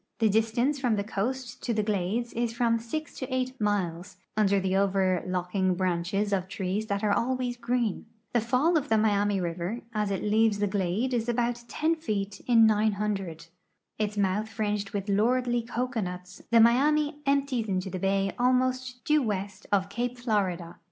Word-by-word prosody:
The 220 -2 +3
distance 225 +7 +1
from 245 -4 +1
the 200 - -1
coast 240 +4 -3
to 235 - -1
the 215 - +1
glades 210 +3 -1
is 235 -1 -1
from 230 -1 +2
6 295 +7 -5
to 260 0 -5
8 255 -1 -2
miles, 185 -3 -1 0.2
under 200 -2 +3
the 190 0 0
overlooking 185 -1 +1
branches 185 +3 0
of 185 -1 0
trees 190 +3 -3
that 200 0 -2
are 205 -1 +3
always 250 +1 0
green. 235 -3 -1 0.3
The 240 - +3
fall 260 +9 +2
of 295 -2 -2
the 220 - +4
Miami 205 -2 +2
river 175 +6 -3
as 210 -2 0
it 195 -2 -2
leaves 215 0 +3
the 205 - +1
glade 200 +5 -1
is 235 -1 0
about 240 0 -1
10 315 +7 0
feet 205 -10 -3
in 230 -2 +6
900. 205 -5 0 0.5
Its 210 -1 -1
mouth 200 +2 0
fringed 210 -2 -2
with 200 0 -4
lordly 240 +4 +2
cocoanuts, 220 -6 -4
the 235 -1 +5
Miami 290 +6 +4
empties 275 -5 +1
into 190 -1 -2
the 185 - -4
bay 195 +1 +1
almost 255 0 +1
due 300 0 +4
west 200 -3 -3
of 195 -2 +2
cape 245 +4 -3
Florida. 185 -8 -1
215 Hz, 170 wpm, -28 LUFS, 195-245 Hz, 0.5 s, in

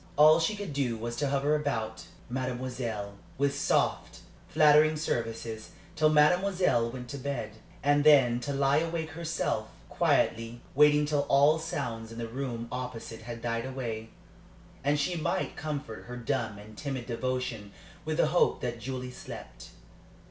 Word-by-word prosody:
All 155 +2 +8
she 165 +6 +1
could 200 -7 -5
do 130 -5 0
was 120 +1 -4
to 145 -2 0
hover 140 +2 +1
about 125 -8 -2 0.2
"mademoiselle" 125 -4 -3 0.2
with 140 +1 +1
soft, 140 - 0 0.3
flattering 155 0 +5
services, 115 -6 -3 0.2
till 155 -1 +4
mademoiselle 165 -4 +3
went 125 +1 -7
to 140 - -5
bed, 125 -5 -3 0.3
and 145 +1 +4
then 135 -6 +6
to 125 +4 -4
lie 140 0 +2
awake 165 -1 -3
herself, 165 +1 -2 0.2
quietly 115 +1 +1
waiting 150 +1 +5
till 145 -1 0
all 145 +3 +5
sounds 115 -8 -4
in 115 - -9
the 115 -1 -3
room 120 -1 -4
opposite 125 -3 -6
had 115 0 -8
died 115 +1 -1
away, 115 -4 -5 0.7
and 145 +1 +2
she 175 +5 0
might 145 -3 -1
comfort 145 -7 -5
her 125 +1 -7
dumb 115 -3 -2
and 105 +1 -12
timid 135 -4 -4
devotion 120 -3 -3 0.3
with 155 0 -2
the 155 - +3
hope 175 - +3
that 120 -1 -3
Julie 125 +1 -5
slept. - - -10
130 Hz, 150 wpm, -29 LUFS, 115-150 Hz, 0.7 s, All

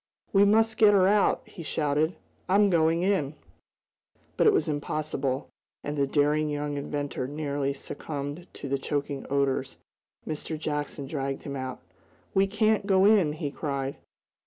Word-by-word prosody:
"We 200 0 +6
must 220 +2 +3
get 210 -2 +7
her 185 -1 +5
out!" 205 0 +3
he - - -11
shouted. 155 +1 0 0.3
"I'm 200 +1 +4
going 165 0 +3
in!" 185 -7 +1 1.0
But - - +3
it - - +8
was 400 - +1
impossible, 145 -3 -2 0.4
and 145 - -3
the 140 -1 +1
daring 150 +2 +2
young 145 0 -2
inventor 145 -2 -3
nearly 145 -1 -2
succumbed 145 +4 -6
to - - -7
the 140 0 -1
choking 140 0 -3
odors. 135 -1 0 0.5
Mr. 155 +1 -4
Jackson 150 -2 -3
dragged 135 -1 -3
him 140 - -5
back. 130 -1 -4 0.6
"We 195 0 +4
can't 215 0 +1
go 190 -1 +5
in!" 200 -8 +5
he 150 -2 -4
cried. 140 -2 -3
150 Hz, 150 wpm, -27 LUFS, 140-185 Hz, 1.0 s, it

